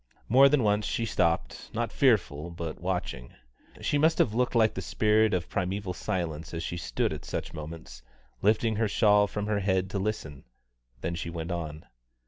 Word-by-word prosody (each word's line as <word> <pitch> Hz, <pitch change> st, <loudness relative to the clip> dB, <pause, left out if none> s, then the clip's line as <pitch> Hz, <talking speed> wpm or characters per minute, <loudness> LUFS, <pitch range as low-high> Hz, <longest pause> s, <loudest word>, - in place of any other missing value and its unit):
More 135 Hz, +3 st, +7 dB
than 140 Hz, -3 st, +3 dB
once 105 Hz, 0 st, +2 dB
she 115 Hz, -, -1 dB
stopped, 85 Hz, -6 st, 0 dB
not 115 Hz, 0 st, -1 dB
fearful, 85 Hz, -, +2 dB
but 85 Hz, -2 st, -6 dB
watching. 90 Hz, -9 st, -3 dB, 0.5 s
She 145 Hz, -, +1 dB
must 160 Hz, +2 st, +4 dB
have 110 Hz, -, +2 dB
looked 125 Hz, +2 st, 0 dB
like 110 Hz, -2 st, +4 dB
the 95 Hz, -, -4 dB
spirit 110 Hz, +4 st, +2 dB
of 90 Hz, -3 st, -1 dB
primeval 95 Hz, 0 st, -2 dB
silence 80 Hz, -3 st, -3 dB
as 85 Hz, -, -3 dB
she 85 Hz, -, -4 dB
stood -, -, -1 dB
at -, -, -7 dB
such -, -, -5 dB
moments, 75 Hz, -5 st, -8 dB, 0.4 s
lifting 110 Hz, +2 st, +2 dB
her 110 Hz, 0 st, +2 dB
shawl 105 Hz, 0 st, +4 dB
from 105 Hz, 0 st, -3 dB
her 105 Hz, -1 st, 0 dB
head 95 Hz, -1 st, 0 dB
to 100 Hz, -, -1 dB
listen; 95 Hz, -9 st, -4 dB, 0.6 s
then 85 Hz, -, -2 dB
she 85 Hz, 0 st, -4 dB
went 85 Hz, +1 st, -5 dB
on. 80 Hz, -3 st, -5 dB
95 Hz, 180 wpm, -28 LUFS, 85-110 Hz, 0.6 s, More